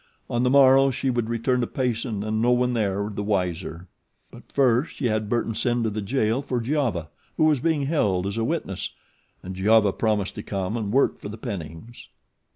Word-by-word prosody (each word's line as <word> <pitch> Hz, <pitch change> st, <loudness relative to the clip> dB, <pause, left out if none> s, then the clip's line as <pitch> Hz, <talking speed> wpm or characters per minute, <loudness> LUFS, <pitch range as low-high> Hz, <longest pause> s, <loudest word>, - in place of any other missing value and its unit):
On 120 Hz, -, +1 dB
the 125 Hz, -, +3 dB
morrow 135 Hz, 0 st, +6 dB
she 135 Hz, 0 st, -1 dB
would 120 Hz, -2 st, -1 dB
return 125 Hz, +2 st, 0 dB
to 120 Hz, -, -1 dB
Payson 115 Hz, -4 st, -2 dB
and 110 Hz, +1 st, -1 dB
no 120 Hz, -, +3 dB
one 125 Hz, 0 st, +2 dB
there 100 Hz, -3 st, 0 dB
the 100 Hz, -, -3 dB
wiser; 90 Hz, -4 st, -2 dB, 0.4 s
but -, -, -15 dB
first 130 Hz, +1 st, +2 dB
she 135 Hz, -, -4 dB
had 110 Hz, -2 st, 0 dB
Burton 115 Hz, -1 st, 0 dB
send 120 Hz, +1 st, 0 dB
to 110 Hz, -, 0 dB
the 105 Hz, +1 st, -3 dB
jail 115 Hz, +2 st, 0 dB
for 130 Hz, -3 st, -2 dB
Giova, 120 Hz, -, -1 dB, 0.3 s
who -, -, +3 dB
was 150 Hz, -3 st, +3 dB
being 150 Hz, 0 st, 0 dB
held 105 Hz, -, +1 dB
as 100 Hz, +1 st, -3 dB
a -, -, 0 dB
witness, -, -, -3 dB, 0.5 s
and 95 Hz, +1 st, -6 dB
Giova 105 Hz, +1 st, +4 dB
promised 105 Hz, -3 st, 0 dB
to -, -, -6 dB
come 95 Hz, +1 st, -3 dB
and 105 Hz, -4 st, -2 dB
work 135 Hz, +4 st, +2 dB
for -, -, -7 dB
the 110 Hz, -, -7 dB
Pennings. 100 Hz, -, -8 dB
115 Hz, 200 wpm, -24 LUFS, 100-125 Hz, 0.5 s, morrow